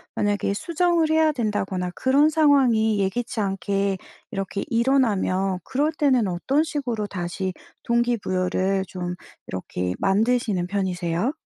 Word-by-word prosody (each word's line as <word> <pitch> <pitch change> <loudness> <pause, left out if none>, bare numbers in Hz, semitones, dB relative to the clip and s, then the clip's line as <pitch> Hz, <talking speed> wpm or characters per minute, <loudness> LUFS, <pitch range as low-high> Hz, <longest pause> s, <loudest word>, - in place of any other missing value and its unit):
만약에 205 -1 0
수정을 335 - +1
해야 315 -1 +4
된다거나 195 -7 -2
그런 280 +4 +4
상황이 255 -9 +3
예기치 225 +4 -1
않게 195 0 -1 0.3
이렇게 195 -1 -3
일어나면 220 -7 +1
그럴 290 +4 0
때는 265 -9 +2
어떤 265 - +1
식으로 250 -9 -3
다시 185 0 -3 0.3
동기부여를 195 -5 0
좀 180 -1 -5 0.3
이렇게 90 -1 -3
만드시는 205 -2 +1
편이세요? 185 - -1
205 Hz, 300 characters per minute, -24 LUFS, 190-265 Hz, 0.3 s, 해야